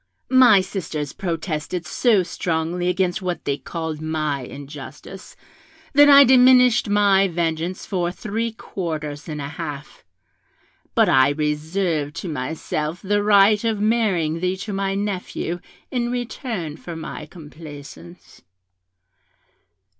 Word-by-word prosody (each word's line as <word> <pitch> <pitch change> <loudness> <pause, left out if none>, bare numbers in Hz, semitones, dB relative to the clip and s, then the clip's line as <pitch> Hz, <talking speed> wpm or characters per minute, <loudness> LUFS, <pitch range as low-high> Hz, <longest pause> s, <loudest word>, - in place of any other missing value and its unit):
My 250 -6 +7
sisters 160 -7 -5
protested 165 -1 -3
so 210 +3 +2
strongly 170 +1 -2
against 180 0 0
what 175 -3 -4
they 140 - 0
called 160 0 -5
my 155 -2 -1
injustice, 145 +7 -10 0.6
that 290 +1 +7
I 280 0 +10
diminished 250 -3 +5
my 200 -1 +4
vengeance 170 +1 -2
by 180 -3 -1
three 220 +5 -3
quarters 155 -8 -5
and 150 -1 -5
a 140 - -4
half; 145 -1 -7 0.9
but - - +4
I 130 0 +5
reserved 150 +1 -1
to 175 - -5
myself 150 +4 -4
the 205 +1 +1
right 205 +1 +5
of 225 -2 0
marrying 200 -8 +1
thee 185 +2 -1
to 210 - -5
my 195 0 -1
nephew 190 -3 -3 0.3
in 240 -2 -1
return 230 - -4
for 170 0 -8
my 155 -1 -7
complaisance. 155 +1 -12
175 Hz, 120 wpm, -22 LUFS, 155-205 Hz, 0.9 s, I